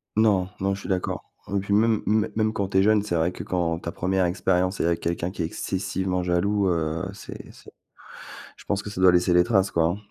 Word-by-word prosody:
Non. 100 -4 +3
Non, 100 +1 0
je 100 - -6
suis - - -8
d'accord. 95 -2 -3 0.2
Et 100 - +2
puis, 100 +1 -2
même 110 +1 +3
m 110 0 +2
même 110 0 +1
quand 100 -3 -2
tu 95 - 0
es - - +4
jeune, 105 0 +4
c'est 105 -4 -2
vrai, 85 +1 +1
que - - -7
quand 85 -2 -1
ta 85 - -5
première 95 +1 0
expérience 90 +1 0
est - - +1
avec 85 0 +1
quelqu'un 85 +1 -2
qui 95 - -6
est - - 0
excessivement 95 +2 -2
jaloux, 95 +3 +1
heu, 80 -1 -1
c'est 105 - -10
c'est - - -15 0.9
je - - -16
pense 100 0 -1
que 105 - -6
ça 95 -3 -5
doit 95 -1 +7
laisser 90 0 +3
les 90 0 +6
traces, 100 -3 +2
quoi, 80 -1 +2
hein. 85 +4 0
95 Hz, 245 wpm, -25 LUFS, 90-100 Hz, 0.9 s, doit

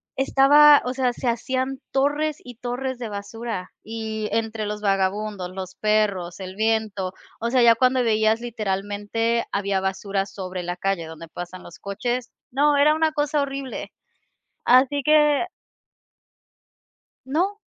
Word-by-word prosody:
Estaba, 285 +2 +6
o 250 - -1
sea, 255 -1 +1
se 250 - -5
hacían 260 +3 -1
torres 290 +3 +1
y 245 -1 -11
torres 250 +1 -3
de 230 -3 -4
basura 205 -1 -5
y 220 -1 -4
entre 225 -1 -1
los 210 0 -4
vagabundos, 195 -1 0
los 185 0 -7
perros, 200 -5 0
el 185 -1 -7
viento, 215 -3 0 0.3
o 235 - 0
sea, 250 -1 +3
ya 230 -1 +8
cuando 255 +2 +3
veías, 220 -1 +2
literalmente, 220 0 -1
había 200 -1 0
basura 195 +1 -1
sobre 185 -2 -6
la 175 +1 -4
calle 190 -3 -1
donde 160 +1 -9
pasan 175 +2 -8
los 175 - -13
coches. 240 +5 -3 0.2
No, 290 +3 +3
era 295 +2 +5
una 315 0 +2
cosa 295 0 0
horrible. 275 -2 -5 0.7
Así 265 +3 +4
que 300 +1 +4 1.8
No. 360 +9 0
225 Hz, 140 wpm, -23 LUFS, 195-265 Hz, 1.8 s, ya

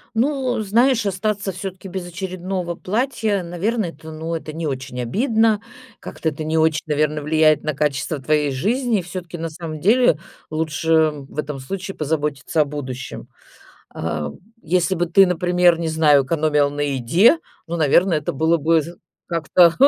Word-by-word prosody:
Ну, 260 -1 0
знаешь, 230 +2 +3
остаться 200 +1 -1
всё-таки 190 +1 -7
без 180 -1 -5
очередного 180 0 -4
платья, 215 -1 -1
наверно, 195 +6 -1
это, 160 -1 -9
ну, 160 +2 -5
это 155 -1 -5
не 165 0 -4
очень 130 -2 -4
обидно. 220 - +2 0.4
Как-то 160 - -3
это 155 +1 -6
не 160 +1 -1
очень, 160 -1 +2
наверно, 150 0 0
влияет 155 0 +3
на 155 - -1
качество 145 0 -1
твоей 150 +1 +1
жизни. 225 - 0
И - - -2
всё-таки, 175 -1 -7
на 165 0 -4
самом 155 -1 -7
деле, 220 - +4 0.3
лучше 160 0 +2
в 140 0 -11
этом 150 -2 -3
случае 190 +8 -5
позаботиться 150 0 -1
о - - +3
будущем. 135 -3 -6 0.7
А, 75 -2 -3 0.3
если 180 +3 +1
бы 175 +1 0
ты, 195 +3 +6
например, 180 -1 +3
не 165 -1 -1
знаю, 150 -3 +4
экономила 150 0 +2
на 145 0 -4
еде, 145 - +4 0.3
ну, 170 - -3
наверно, 170 +3 +3
это 150 -1 -1
было 160 +4 +2
бы 160 +1 +3
з 170 +3 -9 0.3
как-то 170 0 +4
165 Hz, 160 wpm, -21 LUFS, 150-190 Hz, 0.7 s, ты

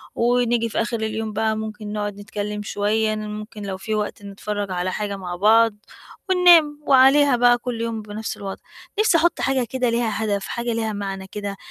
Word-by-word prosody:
ونيجي 240 -1 +2
في - - -1
آخِر 230 0 -2
اليوم 220 0 -3
بقى 220 +1 0
ممكن 215 -1 -6
نقعُد 205 -1 -3
نتكلِّم 210 0 -5
شوية، 215 +2 0
ن 215 0 -5
ممكن 210 0 -7
لو 195 -1 -4
في 215 +3 -3
وقت 205 -1 -3
نتفرّج 200 0 -4
على 180 0 -1
حاجة 200 -1 -3
مع 180 -2 -5
بعض 220 +3 +4 0.6
وننام 340 -5 +6
وعليها 270 0 +6
بقى 245 0 +5
كل 240 -2 -4
يوم 230 -1 -3
بنَفْس 210 +1 -6
الوضع. 195 -1 -7 0.4
نَفْسي 430 -6 +4
أحُط 340 +2 +1
حاجة 265 -2 +1
كده 255 -2 0
ليها 225 -2 -1
هدف، 200 -2 -1
حاجة 235 0 -2
ليها 220 -1 -2
معنى 195 -1 -5
كده، 205 -1 -5
220 Hz, 185 wpm, -22 LUFS, 205-240 Hz, 0.6 s, وننام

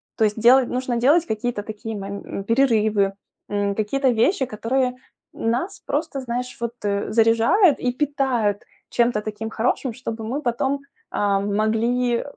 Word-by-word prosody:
то 220 - +1
есть 210 +1 +1
делать 245 +3 +6
нужно 250 -1 -1
делать 295 +8 +4
какие-то 220 -2 -2
такие 220 0 -6
мом 200 +1 -6
м, 195 - -5
перерывы, 215 -4 +2 0.4
м, 205 -1 0
какие-то 260 +6 +1
вещи, 255 - +2
которые 250 +3 -1 0.4
нас 250 - -2
просто, 290 -2 -2
знаешь, 250 0 -4
вот, 235 0 -3
э, 200 0 -1
заряжают 230 - +4
и 250 - 0
питают 255 -7 0 0.3
чем-то 235 -3 +1
таким 215 +1 -5
хорошим. 245 +2 -1
Чтобы 225 -2 -6
мы 260 +7 -3
потом, 265 +2 -1 0.3
а, 200 -1 +1
могли 225 +4 +1
235 Hz, 145 wpm, -22 LUFS, 215-255 Hz, 0.4 s, делать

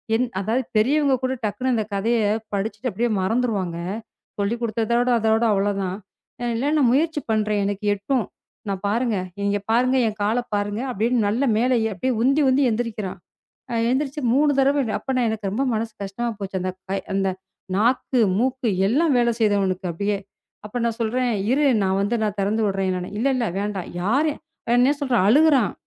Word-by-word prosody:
எந் 245 +3 +2 0.2
அதாவது 225 +6 0
பெரியவங்க 275 +5 +3
கூட 260 0 0
டக்குன்னு 255 +5 -1
அந்தக் 215 -2 -2
கதைய 230 +4 +1 0.3
படிச்சுட்டு 205 +4 -2
அப்டியே 235 +5 0
மறந்துருவாங்க. 195 -4 0 0.6
சொல்லிக் 205 +4 -1
குடுத்ததோட 235 +2 0
அதோட 220 +1 +2
அவ்ளோ 200 +1 +1
தான். 185 0 -2 0.5
அ - - -2
இல்ல 270 +6 0
நான் 265 -5 +4
முயற்சி 315 +2 +1
பண்றேன். 215 -1 +1
எனக்கு 205 +1 -3
எட்டும். 220 +4 -1 0.4
நான் 195 -1 -3
பாருங்க, 230 0 0 0.3
இங்க 200 0 +1
பாருங்க 255 +3 +3
என் 215 -1 -4
கால 220 +4 +1 0.2
பாருங்க 205 +2 -2
அப்டின்னு. 235 +1 +1
நல்ல 230 +6 0
மேல 245 +3 +2 0.2
எ - - -2
அப்டியே 255 +7 -1
உந்தி 275 +4 +3
உந்தி 270 +2 +3
எந்திரிக்கிறான். 215 -4 -3 0.6
அ - - -1 0.2
எந்திருச்சு 275 +2 -1
3 290 +2 +4
தடவ. 275 +1 +3
அப்ப 265 -1 -3
எனக்கு 215 -3 -3
ரொம்ப 255 +7 0
மனசு 225 +1 -2
கஷ்டமா 220 +5 -3
போச்சு. 195 -1 -3
அந்தக் 185 0 -4
கை 195 - 0 0.2
அந்த 195 0 +1 0.5
நாக்கு, 245 +3 +2 0.2
மூக்கு 255 +1 0 0.2
எல்லாம் 290 +6 +2
வேல 240 -1 +3
செய்தவனுக்கு 195 -4 +1
அப்டியே. 200 +4 -1 0.5
அப்ப 240 +4 -4
நான் 230 -1 -2
சொல்றேன், 245 +2 0 0.2
"இரு 290 +2 +3 0.2
நான் 190 0 +1
வந்து 215 +4 0
நான் 210 -1 -2
தெறந்து 210 +3 0
விடுறேன்." 190 -2 -1
இல்ல, 235 - 0
இல்ல 240 -2 0
வேண்டாம். 200 -3 -3
யாரு 275 - +2 0.5
என்ன 260 +4 +4
சொல்ற? 260 -3 +1
அழுகுறான். 275 - +4
225 Hz, 165 wpm, -23 LUFS, 205-255 Hz, 0.6 s, நான்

